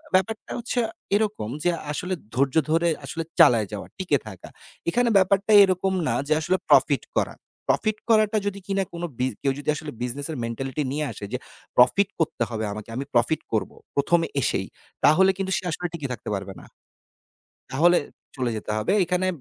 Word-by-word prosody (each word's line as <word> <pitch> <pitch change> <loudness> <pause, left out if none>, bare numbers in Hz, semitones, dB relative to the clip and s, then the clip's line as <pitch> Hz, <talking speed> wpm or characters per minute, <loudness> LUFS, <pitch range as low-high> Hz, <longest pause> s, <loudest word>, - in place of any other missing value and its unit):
ব্যাপারটা 215 +4 0
হচ্ছে 240 +1 -2 0.4
এরকম 210 - 0
যে 175 - +3 0.2
আসলে 180 +5 -3 0.2
ধৈর্য 135 +1 +1 0.2
ধরে 165 +1 +3 0.2
আসলে 165 - -4 0.2
চালায় 115 -4 +6
যাওয়া, 105 -2 -6
টিকে 185 -7 +1
থাকা। 95 -4 -10 0.4
এখানে 240 +6 +2
ব্যাপারটা 195 +2 +3
এরকম 190 0 +1
না - - +1
যে, 155 - +3
আসলে 180 +4 +1
প্রফিট - - +5
করা। - - +1 0.3
প্রফিট 215 -1 +1
করাটা 215 -1 +4
যদি 200 0 -3
কিনা 195 -1 +1
কোন 170 0 -6 0.2
বিজ 130 +1 +1
কেউ 135 - +1
যদি 145 - -4
আসলে 150 0 -6
বিজনেস 125 +3 -3
এর 155 - -4
মেন্টালিটি 135 +5 -3
নিয়ে 150 +2 -1
আসে 100 - -7
যে - - +1 0.4
প্রফিট 185 +11 +5
করতে 155 -7 0
হবে 110 -2 -3
আমাকে। 105 +1 -8
আমি 135 +3 -3
প্রফিট 120 +6 +2
করব। 110 - 0 0.2
প্রথমে 165 +4 +2
এসেই। - - 0 0.4
তাহলে 180 +6 +6
কিন্তু 190 -1 -2
সে 190 - -4
আসলে 175 +3 -2
টিকে 150 -5 -4
থাকতে 115 - -7
পারবে 95 0 -5
না। - - -14 1.1
তাহলে 170 +6 +5 0.4
চলে 125 -2 0
যেতে 105 - -5
হবে। 110 - +1
এখানে 180 +1 0
160 Hz, 175 wpm, -24 LUFS, 125-190 Hz, 1.1 s, চালায়